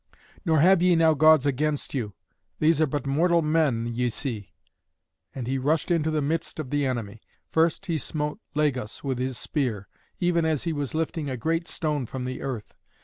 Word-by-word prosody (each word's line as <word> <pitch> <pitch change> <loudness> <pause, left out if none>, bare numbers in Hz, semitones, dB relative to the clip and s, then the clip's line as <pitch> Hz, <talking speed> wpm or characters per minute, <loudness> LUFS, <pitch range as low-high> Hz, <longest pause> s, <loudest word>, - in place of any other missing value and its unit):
Nor 160 -5 +3
have 185 +1 +6
ye 180 -1 +5
now 165 -1 +5
gods 155 -1 +5
against 145 +2 0
you. 110 -8 -3 0.4
These 155 0 +3
are 155 - +4
but 145 -1 -3
mortal 165 +5 +3
men 150 -7 +2
that 120 - -3
ye 120 +1 0
see." 110 -4 -4 0.9
And 130 -3 -4
he 135 +2 -1
rushed 155 +6 +1
into 160 -2 +2
the 155 -2 0
midst 160 +3 -2
of 140 -4 -5
the 145 -1 +1
enemy. 110 -4 -4 0.3
First 160 0 +2
he 165 -3 -1
smote 150 +5 -3 0.2
Lagus 130 -8 -1
with 135 -3 -2
his 130 -1 -2
spear, 120 -10 -2 0.3
even 175 -1 +2
as 160 -3 0
he 165 - -1
was 145 -1 -3
lifting 160 -2 -2
a 130 - -3
great 165 +7 -1
stone 150 -7 -2
from 130 +1 -5
the 130 0 -5
earth. 125 -6 -5
150 Hz, 195 wpm, -26 LUFS, 130-160 Hz, 0.9 s, have